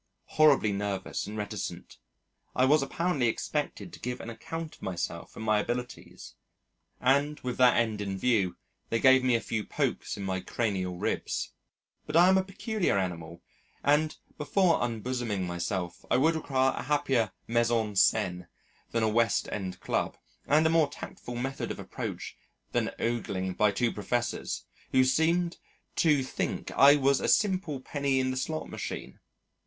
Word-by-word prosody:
Horribly 145 -9 +5
nervous 100 -1 -3
and 105 +1 -6
reticent. 105 -1 -5 0.6
I 130 - +4
was 150 +3 +5
apparently 140 -2 0
expected 150 +8 -3
to - - -10
give 125 0 -4
an 115 - -6
account 160 +8 -6
of - - -18
myself 85 -2 -4
and 110 - -6
my 110 -1 +3
abilities 125 +3 -5 0.7
and 140 +3 +2
with 125 -1 -3
that 125 -1 +5
end 110 -3 +1
in 100 -1 -3
view, 100 -5 +1 0.3
they 115 - +1
gave 130 0 +6
me 125 -2 +3
a - - +2
few 110 -1 -3
pokes - - -2
in 100 - -5
my 95 -1 -1
cranial 95 -3 -2
ribs. - - -2 0.6
But 150 - -4
I 175 +2 +7
am 190 0 +5
a - - 0
peculiar 195 - -1
animal, 85 -3 -4 0.4
and, 150 +2 +2 0.2
before 170 +3 +2
unbosoming 120 -4 -2
myself, 90 0 -3
I - - +4
would 160 +5 +4
require 135 -4 +1
a - - -4
happier 135 -7 +1 0.2
mise 115 0 +2
en 110 -3 0
scène 95 -3 +2 0.4
than 115 - 0
a - - +3
West 115 0 +2
End 95 -3 -4
Club, - - -1 0.3
and 155 +2 +4
a - - +5
more 160 -3 +4
tactful 120 -3 -8
method 135 +3 -3
of - - -4
approach - - -6 0.4
than - - +1
ogling 100 -6 -2
by 105 +3 +3
two 115 +3 +1
professors, 120 +4 -2 0.3
who 130 -1 +6
seemed 165 +6 +2 0.4
to 150 -5 +4
think 130 - -3
I 140 +1 +7
was 140 -1 +3
a - - 0
simple 185 -8 +2
penny 140 0 0
in 130 0 +1
the 130 - -3
slot 155 +4 -3
machine. - - -6
125 Hz, 165 wpm, -29 LUFS, 105-145 Hz, 0.7 s, I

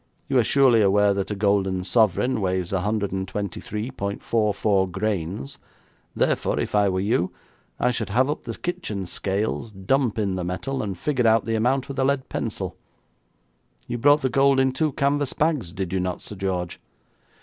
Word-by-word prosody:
You 135 -3 +3
are - - +4
surely 125 -2 +4
aware 100 0 +4
that 100 -1 -2
a 105 - -2
golden 100 -2 +1
sovereign 110 +4 +2
weighs 90 -2 -1
123.44 100 +1 -1
grains, 95 -6 -3 0.6
therefore, - - +1
if - - -3
I 105 -1 +4
were 95 0 0
you, 95 -3 +1 0.5
I 125 - +2
should 115 -3 -3
have 125 +6 +3
up 150 +2 -2
the - - -5
kitchen 175 - -4
scales, 100 +5 -2
dump 110 +5 0
in 100 -3 0
the 90 - -2
metal, 95 +10 -3
and 100 -4 -4
figure 125 +1 +1
out 110 -1 +4
the 115 - -1
amount 125 +4 +1
with 135 -1 -5
a - - +3
lead 135 0 0
pencil. - - -4 1.1
You 120 - -3
brought 145 +4 +5
the 130 - +2
gold 135 +1 +4
in 130 0 +3
two 150 +4 0
canvas 140 0 0
bags, 150 - 0
did 95 -1 -4
you 95 - +1
not, 90 -1 -3
Sir - - -7
George?' 95 -3 -3
105 Hz, 170 wpm, -24 LUFS, 95-130 Hz, 1.1 s, brought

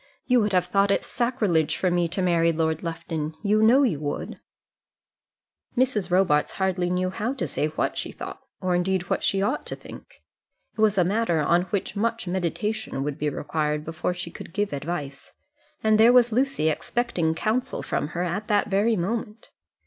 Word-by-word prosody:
You 250 -2 +4
would 210 -1 0
have 180 -1 +3
thought 195 +2 +2
it 200 - +1
sacrilege 215 - 0
for 185 - +1
me 175 -1 +2
to 185 +3 -2
marry 170 -2 +3
Lord 160 -1 0
Lufton! 165 -2 -4
You 210 +1 +3
know 245 +6 +6
you 200 - +1
would." 145 -1 -4 1.4
Mrs. 225 -7 +1
Robarts 180 -5 +2
hardly 185 -2 0
knew 180 +1 0
how 225 +8 -2
to 175 -11 -2
say 150 - -1
what 155 - -2
she - - -4
thought, - - -8 0.2
or 185 -1 0
indeed 180 0 0
what - - +1
she 195 0 +1
ought 205 - 0
to - - -4
think. - - -13 0.5
It 220 - -3
was 215 -2 +3
a 180 - +5
matter 195 -2 +1
on 170 +4 +2
which 195 +2 -3
much 230 +2 -1
meditation 190 -1 -2
would 145 +1 -4
be 150 - 0
required 150 +1 -2
before 165 +2 -2
she 175 -1 -6
could 165 - -10
give 205 -5 -1
advice, 145 -1 -5 0.5
and 220 0 +4
there 230 +2 +8
was 245 -1 +5
Lucy 255 - +1
expecting 165 -2 -1
counsel 250 +8 -1
from - - -1
her 175 - +1
at 195 +4 -3
that 205 -1 +2
very 205 +4 +2
moment. 210 +4 -4
185 Hz, 185 wpm, -25 LUFS, 165-215 Hz, 1.4 s, there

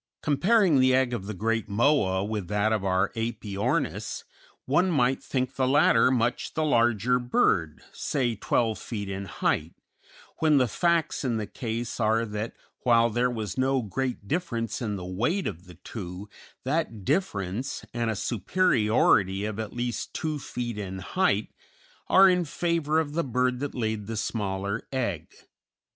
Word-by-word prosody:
Comparing 175 - +3
the 130 0 +5
egg 130 -2 +2
of 100 -5 -4
the 110 - -3
great 115 +3 -1
Moa 100 -4 +2
with 105 -3 -3
that 105 +2 +1
of 105 -3 -1
our 95 0 +2
Æpyornis 110 - -2 0.4
one 175 +8 +2
might 130 -5 +2
think 130 0 -2
the 130 0 0
latter 145 -1 +5
much 120 -1 0
the 155 - +1
larger 120 -2 +3
bird, 90 -10 +1
say 125 -5 -1
twelve 110 +2 0
feet 105 -4 -5
in 100 0 -4
height, 80 -3 -1 0.6
when 155 -2 +4
the 130 -2 +3
facts 170 +7 +1
in 120 -4 0
the 110 - -2
case 115 +2 -4
are 115 +1 +2
that 105 +1 -5 0.2
while 115 -2 +3
there 120 +3 +1
was 110 -1 -4
no 130 -1 +2
great 115 +1 -3
difference 120 - -2
in 105 -4 -2
the 90 -2 -6
weight 120 - -1
of 90 -2 -5
the 90 -1 -13
two, 95 +1 -8 0.4
that 130 - -2
difference, 115 - -1
and 120 -1 -1
a 110 - -1
superiority 105 - +2
of 110 0 -4
at 110 -2 -4
least 120 -2 -4
two 155 -2 -2
feet 120 -5 -5
in 95 -2 -5
height, 105 - 0 0.6
are 195 +1 +7
in 180 -1 +3
favor 160 -1 0
of 150 -2 -2
the 170 +2 0
bird 125 -1 0
that 145 +1 -4
laid 110 -3 -2
the 115 -1 -4
smaller 100 0 -2
egg. 115 - -2
115 Hz, 160 wpm, -27 LUFS, 105-135 Hz, 0.6 s, are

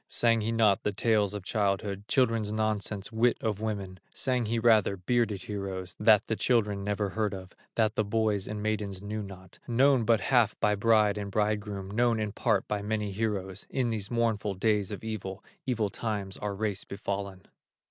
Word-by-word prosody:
Sang 115 -1 +2
he 110 +2 -1
not 110 -4 +3
the 105 - 0
tales 105 -1 +2
of 100 - -5
childhood, 100 -1 -1
Children's 115 -5 +2
nonsense, 110 -2 -2
wit 115 +2 +2
of 110 -3 -2
women, 100 -4 -4 0.2
Sang 125 -3 0
he 115 +2 0
rather 110 -3 +4
bearded 105 +1 0
heroes, 95 -3 -5
That 105 -1 +5
the 110 - -1
children 105 -5 +1
never 105 0 -1
heard 105 -1 -1
of, 95 0 -10 0.2
That 110 -2 +2
the 110 - +1
boys 105 -1 0
and 105 0 -4
maidens 105 -3 -2
knew 105 +1 -3
not, 95 -2 -11
Known 130 +1 +4
but 115 -1 +3
half 120 -4 +2
by 105 - +3
bride 105 0 +3
and 100 -1 -4
bridegroom, 105 -2 -1
Known 115 +1 +2
in 105 -1 -2
part - - 0
by 105 -1 -1
many 105 0 -2
heroes, 100 -2 -3
In 125 -3 0
these 105 -3 -3
mournful 110 -4 0
days 105 0 +1
of 105 - -6
evil, 105 -3 -5 0.2
Evil 110 -5 0
times 100 -4 -3
our 105 -1 -3
race 105 -1 -2
befallen. 100 -1 -5
105 Hz, 180 wpm, -29 LUFS, 100-110 Hz, 0.2 s, That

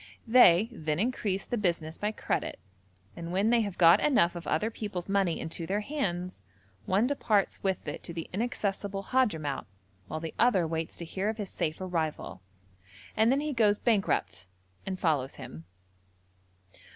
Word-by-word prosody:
They 225 -5 +6
then 155 -9 -2
increase 205 -3 -1
the 240 - -2
business 170 -5 -1
by 210 +1 0
credit, - - -3 0.6
and 170 0 -6
when 200 +5 +2
they 240 -1 +4
have 200 -4 -4
got 170 -1 +7
enough 240 -12 +3
of 175 - -7
other 215 +8 0
people's 205 -6 -5
money 195 -4 +1
into 165 +1 -5
their 205 +2 0
hands, 185 - -3 0.5
one 200 +5 +3
departs 220 -7 +1
with 190 -4 -1
it 145 - -4
to - - -6
the 165 -1 -5
inaccessible 200 -2 -2
Hadhramout, 160 - 0 0.4
while 155 - -4
the 160 0 -6
other 215 -8 +4
waits 160 0 -3
to 170 - -5
hear 190 +5 -2
of 220 - -3
his 205 -4 -5
safe 155 0 -2
arrival, 165 - -3 0.7
and 220 +2 +4
then 275 +2 +2
he 300 -1 -2
goes 210 -4 +3
bankrupt 200 - 0 0.4
and 190 -1 -3
follows 145 -6 0
him. 80 +1 -10
190 Hz, 165 wpm, -29 LUFS, 165-220 Hz, 0.7 s, got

